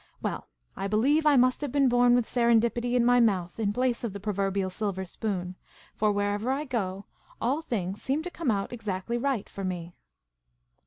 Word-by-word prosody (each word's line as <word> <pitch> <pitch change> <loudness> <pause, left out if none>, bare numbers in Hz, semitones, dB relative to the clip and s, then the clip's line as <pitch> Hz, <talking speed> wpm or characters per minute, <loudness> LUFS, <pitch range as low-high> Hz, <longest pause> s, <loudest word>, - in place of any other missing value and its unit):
Well, - - -4 0.3
I 195 - -3
believe 275 +10 +3
I 295 - +6
must 255 +1 +3
have 290 -3 -3
been 280 -1 +3
born 245 0 +5
with 245 -2 +2
serendipity 235 +1 +2
in 240 -1 +3
my 245 0 +5
mouth, 190 -5 +1
in 205 -2 +1
place 250 +2 0
of 225 -5 -3
the 200 - -6
proverbial 195 -2 -1
silver 190 -1 -3
spoon, 185 -1 -4 0.4
for, 215 0 +1
wherever 205 +4 0
I 285 +3 -1
go, 200 -7 -3 0.3
all 270 +7 0
things 200 - -3
seem 280 +4 -1
to 360 - -5
come 330 -7 -2
out 200 +1 -1
exactly 225 0 -3
right 265 -4 -1
for 195 - -7
me. 175 -2 -4
225 Hz, 190 wpm, -28 LUFS, 195-250 Hz, 0.4 s, I